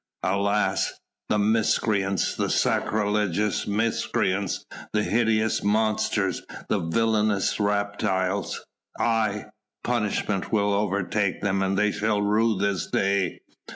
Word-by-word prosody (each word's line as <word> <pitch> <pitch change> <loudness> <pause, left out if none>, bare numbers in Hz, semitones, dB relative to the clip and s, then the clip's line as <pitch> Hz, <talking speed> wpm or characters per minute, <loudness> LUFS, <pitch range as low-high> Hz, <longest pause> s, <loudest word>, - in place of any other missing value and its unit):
"Alas!" 100 +1 +1 0.4
"The 105 - +2
miscreants! 105 -3 +1
the - - -1
sacrilegious 105 -1 0
miscreants! 100 -3 0 0.3
the 105 0 +2
hideous 110 -1 +1
monsters! 110 +1 +1 0.3
the - - +2
villainous 105 +3 +1
reptiles! 100 -2 -1 0.3
Aye! 110 -3 +1 0.4
punishment 105 -4 -1
will 105 -2 +2
overtake 100 0 0
them; 95 -1 0
they 105 +1 +2
shall 105 0 0
rue 110 +1 +2
this 100 -3 -1
day! 100 -2 0
105 Hz, 95 wpm, -25 LUFS, 100-110 Hz, 0.4 s, The